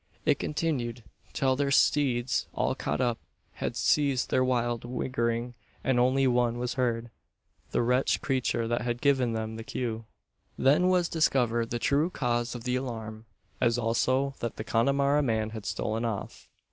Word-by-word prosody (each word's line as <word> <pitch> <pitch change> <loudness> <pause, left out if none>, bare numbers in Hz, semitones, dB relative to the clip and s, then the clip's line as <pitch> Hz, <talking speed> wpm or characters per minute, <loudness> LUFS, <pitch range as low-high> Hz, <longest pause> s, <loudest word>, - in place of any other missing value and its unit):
It - - +3
continued, 125 -7 -2 0.3
till 130 -1 +1
their 140 +1 0
steeds, 130 -3 +2
all - - +1
caught - - -3
up, 120 -2 0 0.4
had - - -2
ceased 140 -4 +1
their 130 - +3
wild 120 -2 0
whighering; 120 -1 -2 0.3
and 130 -2 +2
only 130 +2 +3
one 120 -2 +2
was 125 0 -2
heard 120 -3 -1 0.6
the - - +1
wretched 125 +3 +2
creature 125 -3 0
that 120 +1 0
had 120 -1 -2
given 130 -4 +2
them 110 0 -3
the 115 - -6
cue. 115 -1 -4 0.5
Then 150 +7 +4
was 180 -2 +3
discovered 120 -8 +1
the 120 - -1
true 145 +7 +2
cause 120 -6 -1
of 120 - -7
the 125 +1 0
alarm; 110 -4 -6 0.4
as 120 -1 +3
also 130 +4 +1
that 115 - -3
the - - -5
Connemara 140 +6 +2
man 110 -5 0
had 110 -2 -7
stolen 110 +2 -2
off. 115 -4 -5
120 Hz, 160 wpm, -28 LUFS, 115-135 Hz, 0.6 s, Then